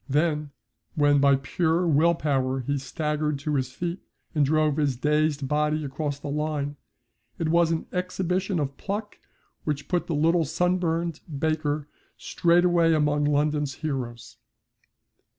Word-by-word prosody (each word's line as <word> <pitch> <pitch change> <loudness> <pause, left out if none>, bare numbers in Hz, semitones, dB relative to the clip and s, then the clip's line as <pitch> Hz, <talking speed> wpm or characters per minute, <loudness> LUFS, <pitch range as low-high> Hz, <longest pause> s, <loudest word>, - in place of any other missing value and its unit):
Then 150 +1 +1 0.5
when 145 -1 +4
by 140 0 +5
pure 160 +5 0
will 165 +2 +4
power 135 -4 0
he 140 +3 -1
staggered 150 +1 -2
to 150 +2 -3
his 130 -2 -1
feet 175 +6 -4 0.3
and 150 -3 +3
drove 155 0 +2
his 145 -4 +1
dazed 150 +1 +1
body 150 +1 +1
across 145 +1 -3
the 145 - -8
line, 150 -1 -2 0.6
it 160 - -1
was 170 0 +4
an 165 - -1
exhibition 180 +1 -1
of 140 -3 -2
pluck 210 +1 -5 0.4
which 145 -2 -3
put 180 -2 -1
the 165 - -1
little 165 +3 +3
sunburned 170 0 0 0.2
baker 155 -1 -1 0.3
straightway 170 -1 +3
among 150 -1 +2
London's 145 -1 +1
heroes. 120 -6 -5
150 Hz, 135 wpm, -26 LUFS, 145-165 Hz, 0.6 s, by